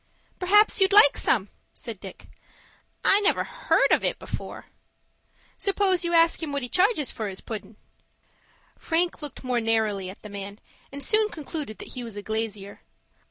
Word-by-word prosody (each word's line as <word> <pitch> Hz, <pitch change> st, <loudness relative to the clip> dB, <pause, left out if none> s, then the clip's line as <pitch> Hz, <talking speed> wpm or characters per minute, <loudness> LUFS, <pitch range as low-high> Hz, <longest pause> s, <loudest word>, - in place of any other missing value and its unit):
"Perhaps 415 Hz, +3 st, +4 dB
you'd 385 Hz, +1 st, +4 dB
like 405 Hz, -9 st, +7 dB
some," 205 Hz, -4 st, +1 dB, 0.3 s
said 225 Hz, -5 st, -8 dB
Dick. 190 Hz, -1 st, -11 dB, 0.8 s
"I 395 Hz, -, +5 dB
never 415 Hz, 0 st, +2 dB
heard -, -, +1 dB
of -, -, +3 dB
it -, -, +1 dB
before." -, -, -7 dB, 0.9 s
"Suppose 390 Hz, -2 st, +2 dB
you 340 Hz, -, -1 dB
ask 335 Hz, 0 st, +4 dB
him 315 Hz, -3 st, -4 dB
what 280 Hz, -2 st, -2 dB
he 245 Hz, -, -3 dB
charges 365 Hz, -, +2 dB
for 220 Hz, -, -4 dB
his 190 Hz, -1 st, -5 dB
puddin'." 210 Hz, -1 st, -8 dB, 1.0 s
Frank 340 Hz, +1 st, -1 dB
looked 295 Hz, -2 st, -6 dB
more 250 Hz, -2 st, 0 dB
narrowly 215 Hz, -4 st, 0 dB
at 190 Hz, -, -12 dB
the 210 Hz, -, -9 dB
man, 200 Hz, 0 st, -7 dB, 0.3 s
and 280 Hz, +1 st, -6 dB
soon 430 Hz, 0 st, +2 dB
concluded 300 Hz, -, -6 dB
that -, -, -10 dB
he 250 Hz, -, -6 dB
was 230 Hz, -3 st, -7 dB
a 205 Hz, -, -6 dB
glazier. 215 Hz, -2 st, -4 dB
260 Hz, 165 wpm, -25 LUFS, -, 1.0 s, like